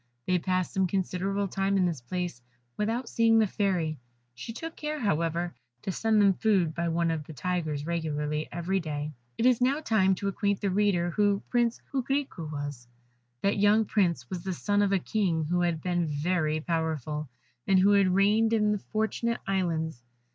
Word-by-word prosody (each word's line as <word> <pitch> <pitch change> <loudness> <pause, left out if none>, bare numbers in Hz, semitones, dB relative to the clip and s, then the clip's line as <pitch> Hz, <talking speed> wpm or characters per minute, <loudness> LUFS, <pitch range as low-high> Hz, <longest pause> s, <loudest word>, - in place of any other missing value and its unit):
They 180 -1 +2
passed 185 0 -1
some 190 -1 +2
considerable 195 +2 -1
time 195 +1 0
in 185 - +3
this 165 -7 -2
place 175 0 -4 0.3
without 230 +4 -1
seeing 230 -1 +3
the 220 - +5
Fairy, 180 -7 -1 0.3
she 125 - -7
took 325 +8 -7
care, 300 0 -4
however, 170 - 0 0.3
to 195 - -2
send 220 +3 +2
them 200 -1 +5
food 185 -6 +2
by 170 +1 -1
one 170 0 +1
of 160 -2 -2
the 160 - -9
Tigers 155 -1 -2
regularly 155 -2 -2
every 180 +3 -1
day. 150 -2 -4 0.2
It 230 - +1
is 250 -1 +4
now 270 +4 +3
time 205 -9 +2
to 200 - -3
acquaint 200 0 0
the 200 - -1
reader 185 -3 +2
who 205 +1 +2
Prince 240 -1 +2
Coquerico 265 - -2
was: 145 -5 -5 0.6
That 200 +1 +2
young 210 +2 +4
Prince 170 - +1
was 175 +3 -5
the 190 - -2
son 205 +3 +1
of 200 -1 +2
a 195 - +4
King 180 -4 0
who 175 +3 0
had 170 -2 0
been 175 -2 0
very 155 +1 0
powerful, 155 -3 -2 0.4
and 195 - +5
who 195 +2 +5
had 200 -1 +5
reigned 215 +3 +3
in 210 -2 +3
the 210 - 0
Fortunate 220 +3 -1
Islands. 165 -8 -1
185 Hz, 185 wpm, -28 LUFS, 165-205 Hz, 0.6 s, the